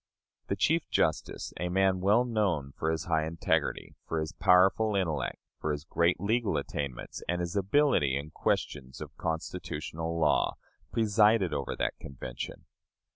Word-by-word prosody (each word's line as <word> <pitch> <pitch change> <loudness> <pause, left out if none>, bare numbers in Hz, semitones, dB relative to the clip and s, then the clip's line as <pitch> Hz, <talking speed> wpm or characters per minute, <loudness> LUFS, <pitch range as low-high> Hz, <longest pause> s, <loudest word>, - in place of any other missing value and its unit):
The - - 0
Chief 165 +1 +1
Justice 80 - 0
a 90 +1 -1
man 95 0 +2
well 105 +6 +4
known 95 - 0
for 80 - -2
his 80 -1 -1
high 80 -2 +1
integrity, 80 -2 -1
for 80 - -1
his 80 0 -3
powerful 95 +4 +4
intellect, 85 -7 -1 0.2
for 75 - -1
his 75 0 -3
great 85 +2 +1
legal 105 -3 +1
attainments, 70 -3 -4
and 90 0 +1
his 85 +1 -3
ability 100 - +3
in 75 +2 -6
questions 65 -4 -2
of - - -8
constitutional 80 0 -4
law 75 -2 +2 0.4
presided 105 -4 +3
over 70 -1 -2
that - - -2
Convention. 60 -3 -7
85 Hz, 145 wpm, -30 LUFS, 75-100 Hz, 0.4 s, well